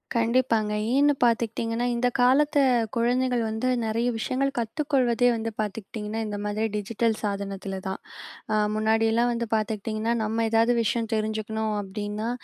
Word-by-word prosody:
கண்டிப்பாங்க. 230 -2 +2 0.2
ஏன்னு 290 +1 +5
பார்த்துக்கிட்டீங்கன்னா, 230 0 0
இந்த 240 +1 +1
காலத்து 290 +5 +4 0.4
குழந்தைகள் 245 +1 +1
வந்து 220 +3 -2 0.2
நிறைய 225 +2 0
விஷயங்கள் 260 +4 0
கத்துக்கொள்வதே 245 -1 +1
வந்து 225 0 -3
பார்த்துக்கிட்டீங்கன்னா, 210 +1 -4
இந்த 205 -1 -4
மாதிரி 210 +1 -1
டிஜிட்டல் 220 +2 0
சாதனத்தில 195 -2 -3
தான். 190 - -3 0.5
அ - - +3 0.2
முன்னாடியெல்லாம் 225 +2 +2
வந்து 235 0 -1
பார்த்துக்கிட்டீங்கன்னா, 215 +1 -1
நம்ம 225 +1 0
ஏதாவது 230 +2 +3
விஷயம் 230 0 -1
தெரிஞ்சுக்கணும் 220 0 -1
அப்பிடின்னா, 205 +3 -4
225 Hz, 125 wpm, -26 LUFS, 215-240 Hz, 0.5 s, ஏன்னு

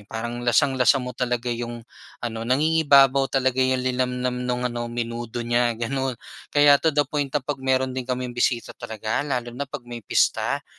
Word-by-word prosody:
Parang 120 +2 -4
lasang-lasa 125 +2 +3
mo 125 - -5
talaga 125 0 -1
yung 120 0 -6 0.4
ano, 115 0 -4
nangingibabaw 140 -2 +4
talaga 130 -1 +1
yung 130 0 +1
linamnam 125 0 -1
nung 125 0 -2
ano 120 -1 -3
menudo 120 0 -4
niya 120 0 +1
gano'n. 130 +2 -2 0.3
Kaya 145 -1 +5
to 160 - +2
the 145 -1 +2
point 145 0 -2
na 140 -1 -2
'pag 140 -1 -3
meron 130 0 +1
din 130 0 -5
kaming 125 -1 -2
bisita 120 0 0
talaga 110 0 -3
lalo 125 -4 -3
na 135 +2 -5
'pag 135 -4 -7
may 120 -1 -8
pista, 105 - +1
125 Hz, 170 wpm, -24 LUFS, 120-135 Hz, 0.4 s, Kaya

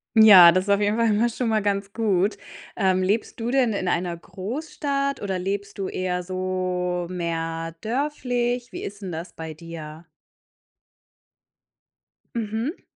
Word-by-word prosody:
Ja, 200 -6 +10
das 185 +2 +1
ist - - -6
auf 200 +1 +3
jeden 205 +2 +1
Fall 230 0 +3
immer 220 +3 +2
schon 235 +1 -2
mal 220 -1 +2
ganz 200 -1 -1
gut. 205 -3 +1 0.4
Ähm, 185 -1 +2
lebst 205 +5 -1
du 230 - -2
denn 250 -3 +3
in 190 -3 -2
einer 175 -1 -1
Großstadt 275 - -3
oder 190 -2 -2
lebst 200 +2 -3
du 195 -1 -2
eher 180 -1 -2
so 185 -1 -2
mehr 165 -2 -3
dörflich? 245 - -2
Wie - - -6
ist 200 +1 -7
'n 180 - -5
das 170 +2 -6
bei 160 -1 -7
dir? 160 0 -9 2.3
Mhm. 225 - -3
195 Hz, 150 wpm, -24 LUFS, 180-225 Hz, 2.3 s, Ja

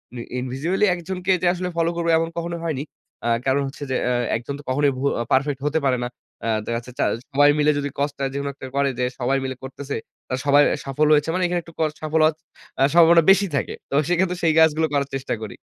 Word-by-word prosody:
Me 120 - -5 0.2
individually 140 +11 0
১ 175 - -5
জনকে 185 0 -1
যে 180 - +2
আসলে 180 0 -3
ফলো 165 0 +2
করবো 170 0 -1
এমন 165 0 0
কখনো 170 0 -3
হয়নি। 150 -5 -2 0.4
আ - - 0 0.2
কারণ 135 +1 +2
হচ্ছে 135 +1 -8
যে - - +1
আ - - +1 0.2
১ 115 - -2
জন 140 - -3
তো - - -11
কখনোই 140 +2 +2
ভু 130 - -4 0.2
আ - - -1
পারফেক্ট 140 +1 +2
হতে 155 +2 +1
পারে 130 -2 +2
না। - - -1 0.4
আ - - -1 0.2
দেখা 115 - -1
জাচ্ছে 120 +2 -8
চা - - +3 0.3
সবাই 145 +1 +5
মিলে 150 0 +4
যদি 145 0 -2
কস্টটা 140 -1 -1
যেকোনো 140 0 -2
একটা 135 - -9
করে 140 0 +2
যে 125 - +1 0.2
সবাই 130 +2 +1
মিলে 130 0 -3
করতেছে, 140 +1 -6 0.3
তারা 130 - -2
সবার 145 0 +6
এ - - -2
সাফল্য 150 +3 +1
হয়েছে। 150 +2 +1
মানে 185 +1 0
এখানে 175 0 0
একটু 165 - -14
কস্ট 155 -1 0
সাফল্য 155 0 +1
হওয়ার 155 0 +2 0.5
আ - - +6
সম্ভাবনা 170 0 +7
বেশি 200 +1 +4
থাকে। 135 - -1 0.2
তো - - -8
সেইক্ষেত্রে 180 +1 +1
সেই 160 - +4
কাজগুলো 160 0 +4
করার 140 -1 +1
চেষ্টা 135 0 -3
করি। 110 - -7
145 Hz, 240 wpm, -22 LUFS, 135-165 Hz, 0.5 s, সম্ভাবনা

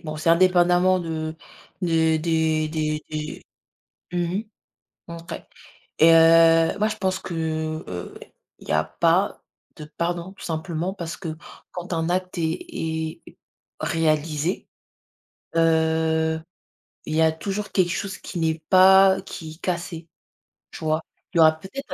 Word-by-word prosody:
bon 155 -1 -5
c'est 155 +2 -2
indépendamment 180 +1 +4
de 160 -2 -4 0.5
des 160 -2 +2
des 160 -1 +1
des 155 -1 -2
des 155 0 -5 0.7
Mmh 175 +4 -1 0.6
mh. 170 - -8
OK 165 0 -8 0.6
et 165 +1 +7
heu, 165 0 +6
moi 215 - +2
je 215 - -4
pense 190 -2 -1
que, 190 - -7 0.6
heu, 90 -1 -7 0.4
il - - -15
y - - 0
a 75 0 +3
pas 170 - +1 0.3
de 155 - -8
pardon, 170 +3 -4
tout 195 - -13
simplement 165 +2 -3
parce 170 -4 -6
que 160 -4 -6 0.3
quand 180 0 -7
un 165 0 -1
acte 185 +1 -2
est 165 - -2 0.6
est - - -17 0.4
réalisé, 155 +1 0 0.9
heu, 160 0 +2 0.6
il 155 - -3
y 160 - +3
a 160 0 +5
toujours 200 +6 -4
quelque 185 -3 +2
chose 195 0 -3
qui 180 - -7
n'est 160 -1 0
pas 190 +1 +6
qui 165 -4 -8
est 160 - -19
cassé, 170 -2 -4 0.7
tu - - -8
vois? 155 +1 +1 0.3
Il - - -5
y - - +6
aura 155 -1 +7
peut-être,, 190 - -9
165 Hz, 145 wpm, -23 LUFS, 160-180 Hz, 0.9 s, et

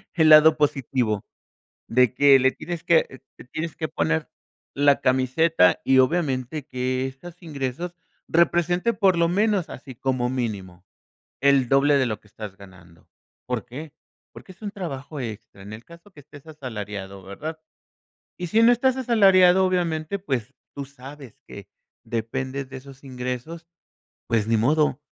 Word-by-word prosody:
el 160 -2 +4
lado 155 0 +8
positivo. 130 -7 0 0.6
De 125 0 +3
que 140 +1 +6
le 130 0 +3
tienes 170 +2 -7
que, 165 -6 +1 0.2
te - - -12
tienes 155 +5 -5
que 160 - -3
poner 80 - -1 0.5
la 140 0 +3
camiseta 130 - +3
y 135 0 +4
obviamente 135 -1 0
que 130 -1 -2
estos 170 +7 -12
ingresos 150 +3 -5 0.3
representen, 175 +6 +2
por 195 -4 +3
lo 170 0 +2
menos 200 -1 +1
así 130 +1 -10
como 125 0 -1
mínimo, 100 -8 -4 0.6
el 135 -3 +3
doble 140 +2 +4
de 130 -2 +1
lo 110 -3 -4
que 105 - -24
estás 105 -2 -9
ganando 90 -4 -17 0.4
¿Por 125 -4 -3
qué? 150 +4 -9 0.4
Porque - - -13
es 185 - -20
un 205 -2 -5
trabajo 155 -6 -6
extra. 110 -5 -8
En 100 +2 -10
el 110 +2 -11
caso 170 +4 -16
que 150 - -15
estés 145 +1 -16
asalariado, 105 -9 -7
¿verdad? 155 +12 -7 0.8
Y 180 - -4
si 220 +6 +2
no 230 - +7
estás 255 +2 +1
asalariado, 190 -7 +5
obviamente, 175 -1 -1
pues 135 - -4 0.2
tú 140 - -5
sabes 135 -1 -12
que - - -11 0.4
dependes 130 +4 -4
de 135 - -7
esos 135 0 -13
ingresos. 125 +6 -6 0.6
Pues 110 -2 0
ni 115 0 +2
modo. 150 +6 +1
140 Hz, 155 wpm, -24 LUFS, 125-170 Hz, 0.8 s, lado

